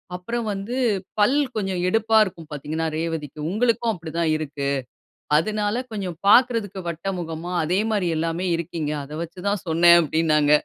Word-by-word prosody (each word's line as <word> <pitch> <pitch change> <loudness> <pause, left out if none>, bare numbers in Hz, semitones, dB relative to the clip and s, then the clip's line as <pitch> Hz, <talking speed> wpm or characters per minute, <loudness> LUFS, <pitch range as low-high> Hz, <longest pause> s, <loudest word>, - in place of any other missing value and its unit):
அப்புறம் 230 +6 -3
வந்து, 200 +5 -4 0.4
பல் 210 +7 +4 0.2
கொஞ்சம் 190 -4 -1
எடுப்பா 220 +2 +3
இருக்கும் 170 -5 -7
பாத்தீங்கன்னா 155 +3 -3
ரேவதிக்கும். 155 -2 -4
உங்களுக்கும் 230 +2 +1
அப்படி 165 -3 -8
தான் 165 -2 +2
இருக்கு. 145 -2 -3 0.7
அதுனால 210 +4 0 0.2
கொஞ்சம் 190 -6 -4
பாக்குறதுக்கு 225 -4 +4
வட்டமுகமா, 170 -1 -4
அதே 180 +5 +1
மாரி 200 -4 +1
எல்லாமே 165 +3 -1
இருக்கீங்க. 165 -2 -3
அத 145 - -10
வச்சு 170 +2 -7
தான் 205 0 -2
சொன்னேன்" 170 +1 +6
அப்டின்னாங்க. 155 -2 +2
175 Hz, 140 wpm, -23 LUFS, 160-205 Hz, 0.7 s, சொன்னேன்